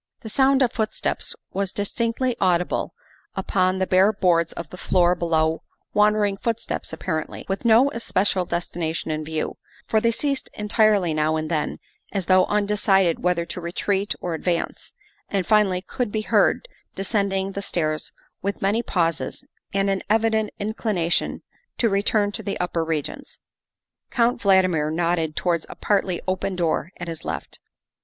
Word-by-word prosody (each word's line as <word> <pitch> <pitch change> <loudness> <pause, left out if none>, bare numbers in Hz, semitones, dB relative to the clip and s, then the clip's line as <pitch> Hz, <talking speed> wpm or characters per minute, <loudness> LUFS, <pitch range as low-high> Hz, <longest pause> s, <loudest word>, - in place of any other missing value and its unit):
The 220 - -7
sound 270 +1 +4
of 245 - +2
footsteps 220 -3 -1 0.2
was 195 -1 -1
distinctly 230 +4 -1
audible 180 -2 +1 0.4
upon 185 +1 +1
the 190 - +1
bare 190 +3 +4
boards 175 -5 +2
of 170 - -7
the 180 - -8
floor 180 -1 +3
below 160 -2 +1 0.3
wandering 210 -1 +3
footsteps 230 +1 -3
apparently, 160 0 -4
with 195 +4 -3
no 235 +5 +6
especial 195 -5 0
destination 170 -2 -3
in 155 0 -2
view, 155 0 -3 0.3
for 220 - +2
they 230 - +3
ceased 275 +4 -1
entirely 210 -4 +2
now 155 +1 +1
and 155 +1 -3
then 155 -2 -1 0.3
as 195 -3 -2
though 185 0 +5
undecided 200 -4 +2
whether 175 -1 +1
to 180 - -6
retreat 195 +4 -1
or 175 - -3
advance, 170 +2 -2 0.4
and 195 -3 0
finally 200 -4 +3
could 245 -2 -3
be 215 - -1
heard 355 - +2 0.3
descending 195 -1 0
the 200 - -4
stairs 155 -5 -2 0.3
with 200 +1 -2
many 205 +4 +1
pauses 170 -8 -1 0.3
and 195 0 +1
an 195 -1 +1
evident 220 0 +2
inclination 205 -5 -1 0.3
to 230 - +2
return 205 +1 +2
to 220 - -5
the 200 -2 -4
upper 175 -2 0
regions. 165 - -4 0.7
Count 240 0 +1
Valdmir 185 -6 +3
nodded 165 -1 0
towards 170 -3 0
a - - -8
partly 195 -4 0
open 190 +1 -1
door 170 -1 0
at 175 - -6
his 165 -2 -6
left. - - -5
190 Hz, 150 wpm, -23 LUFS, 170-215 Hz, 0.7 s, no